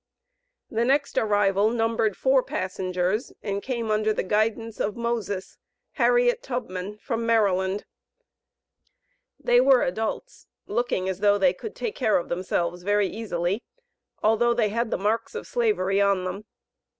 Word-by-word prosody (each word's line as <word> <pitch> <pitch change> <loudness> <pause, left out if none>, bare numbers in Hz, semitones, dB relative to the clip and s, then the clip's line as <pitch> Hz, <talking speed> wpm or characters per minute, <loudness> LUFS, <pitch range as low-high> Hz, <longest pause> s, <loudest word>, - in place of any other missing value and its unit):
The 230 -1 +1
next 280 +3 +1
arrival 205 -1 +3
numbered 225 -2 0
four 265 0 +3
passengers, 185 +2 -2
and 200 0 -2
came 235 -3 -3
under 215 0 +2
the - - -1
guidance 220 +3 0
of 205 - -1
"Moses" 220 -5 -3 0.3
(Harriet 485 -1 +3
Tubman), 210 - -5
from 230 +1 -3
Maryland. 200 -4 +1 1.5
They 245 -3 +4
were 260 -1 +5
adults, 220 - -4 0.2
looking 210 -4 -1
as 190 -1 -2
though 205 0 +4
they 185 -3 +3
could 425 - -8
take 455 -3 -3
care 220 -5 +2
of 175 - -4
themselves 175 -1 -1
very 205 +2 +2
easily, 200 -2 -2 0.6
although 235 +2 +3
they 225 -3 +2
had 230 +2 -1
the - - -1
marks 215 - -1
of 460 - -5
Slavery 310 - +1
on 200 -2 +2
them. 185 +3 -5
215 Hz, 140 wpm, -25 LUFS, 195-235 Hz, 1.5 s, were